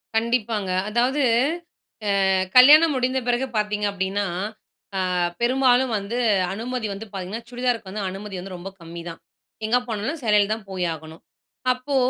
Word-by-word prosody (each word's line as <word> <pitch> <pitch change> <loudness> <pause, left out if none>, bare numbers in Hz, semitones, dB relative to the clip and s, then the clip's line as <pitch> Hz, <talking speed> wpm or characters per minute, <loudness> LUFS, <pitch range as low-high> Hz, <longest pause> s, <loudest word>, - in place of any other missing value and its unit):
கண்டிப்பாங்க. 225 -3 0 0.2
அதாவது 250 +6 +1 1.1
அ - - +4 0.2
கல்யாணம் 300 +5 +8
முடிந்த 255 +1 +1
பிறகு 245 +2 +1
பார்த்தீங்க 210 0 0
அப்படீன்னா, 200 +1 -1 0.9
ஆ - - 0 0.3
பெரும்பாலும் 255 0 +3
வந்து 200 +4 -4 0.4
அனுமதி 235 +2 -3
வந்து 200 +3 -7
பாத்தீங்கன்னா, 195 +4 -5
சுடிதாருக்கு 245 -4 -1
வந்து 205 +2 -4
அனுமதி 195 +1 -7
வந்து 185 +1 -7
ரொம்ப 180 +2 -7
கம்மிதான். 170 0 -8 0.5
எங்க 230 +3 +3
போனாலும் 230 +8 -3
சேலையில 210 -2 +3
தான் 220 -2 -7
போய் 185 -2 -2
ஆகணும். 160 +1 -11 0.5
அப்போ 255 +3 -4
220 Hz, 135 wpm, -23 LUFS, 195-250 Hz, 1.1 s, கல்யாணம்